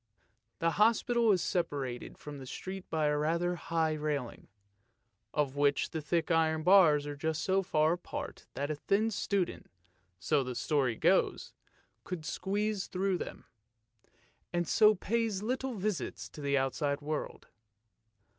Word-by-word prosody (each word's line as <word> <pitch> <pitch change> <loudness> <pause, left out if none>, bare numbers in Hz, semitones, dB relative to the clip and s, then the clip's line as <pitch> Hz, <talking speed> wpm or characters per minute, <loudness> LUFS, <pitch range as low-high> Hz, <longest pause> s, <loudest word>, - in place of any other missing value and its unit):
The 165 0 +1
hospital 230 +1 +4
is 185 -4 +2
separated 140 -8 -2
from 145 -1 -9
the 130 - -9
street 190 +7 -7
by 155 -1 0
a 150 0 +2
rather 170 +3 +1
high 160 -2 0
railing, 150 -5 -3 0.8
of 145 -2 0
which 145 0 +2
the 160 - -3
thick 165 +3 0
iron 160 -1 +2
bars 165 -6 +6
are 145 0 -5
just 160 +2 -2
so 190 +1 +2
far 155 -3 +2
apart 175 - -6
that 145 +2 -2
a - - -1
thin 205 +9 +1
student 195 -2 -2 0.3
— 90 0 -42
so 140 - +4
the 125 -1 -5
story 125 +1 +1
goes - - +1 0.3
— - - -40
could 170 -4 -6
squeeze 205 +3 -1
through 190 -1 0
them, - - -7 1.1
and 175 -1 -1
so 215 +4 +5
pay 230 +4 0
little 245 +6 -2
visits 195 - -3
to 150 - -10
the 140 0 +1
outside 140 +2 0
world. 150 +1 -4
160 Hz, 150 wpm, -31 LUFS, 145-195 Hz, 1.1 s, bars